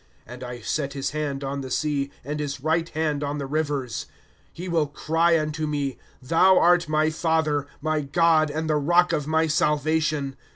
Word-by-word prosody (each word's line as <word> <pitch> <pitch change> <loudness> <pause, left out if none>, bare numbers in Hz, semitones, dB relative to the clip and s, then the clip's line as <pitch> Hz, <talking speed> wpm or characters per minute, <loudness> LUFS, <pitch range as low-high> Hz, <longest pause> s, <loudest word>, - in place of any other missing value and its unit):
^^ - - -34 0.2
And 125 +2 -10
I 120 -1 -7
set 140 +4 -2
his 140 -1 -3
hand 145 -2 -3
on 140 +1 -3
the 130 - -6
sea, 140 0 -1 0.2
And 150 +2 -3
his 145 -2 -3
right 160 +4 0
hand 150 -2 -1
on 145 +1 -2
the 140 - -3
rivers. 145 -4 -2
2s - - -31 0.4
He 180 +2 -8
will 165 -4 +1
cry 165 +3 +2
unto 155 0 -2
me: 140 -3 -2 0.2
Thou 175 +7 +4
art 175 -1 +4
my 155 0 +2
father; 155 -3 0
My 155 0 0
Grod, 155 +2 +3
and 155 +2 -3
the 155 -1 +2
rock 175 +5 +3
of 150 -1 -1
my 160 +1 +2
salvation. 150 -2 0
150 Hz, 195 wpm, -24 LUFS, 140-160 Hz, 0.4 s, Thou